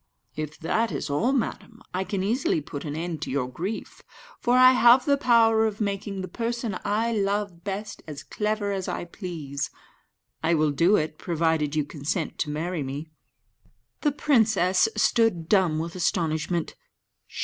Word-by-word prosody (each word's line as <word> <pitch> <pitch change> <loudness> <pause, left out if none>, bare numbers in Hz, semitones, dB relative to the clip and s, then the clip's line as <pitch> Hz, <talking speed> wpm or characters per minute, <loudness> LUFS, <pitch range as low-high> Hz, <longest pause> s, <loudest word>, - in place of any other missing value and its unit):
"If 150 -1 -5
that 220 +6 0
is 140 -1 -3
all, 220 - +2
madam, 230 -3 -3
I 185 +1 0
can 190 -1 -2
easily 225 - +1
put 145 0 -7
an 145 -1 -4
end 165 -1 -4
to - - -4
your 130 -2 -1
grief, 180 - -5 0.4
for 245 +1 +2
I 255 0 +8
have 250 0 +6
the 285 - +4
power 225 -4 +4
of 215 -1 -5
making 200 -2 -2
the 185 - -5
person 235 -2 -3
I 220 +3 0
love 200 -4 -1
best 200 +2 -5
as 150 -3 -7
clever 210 -1 -2
as 190 -2 -3
I - - -3
please. 160 -6 -5 0.7
I 165 +1 +2
will 155 -1 +2
do 170 +8 +4
it, 155 -3 -1
provided 160 -3 0
you 150 -2 +1
consent 150 +3 -3
to - - -1
marry 160 +3 -2
me." 140 +4 -5 0.9
The 295 - +2
princess 220 - +3
stood 225 -9 +2
dumb 185 -6 +3
with 165 +1 -3
astonishment. 165 -1 -1
185 Hz, 160 wpm, -26 LUFS, 155-220 Hz, 0.9 s, I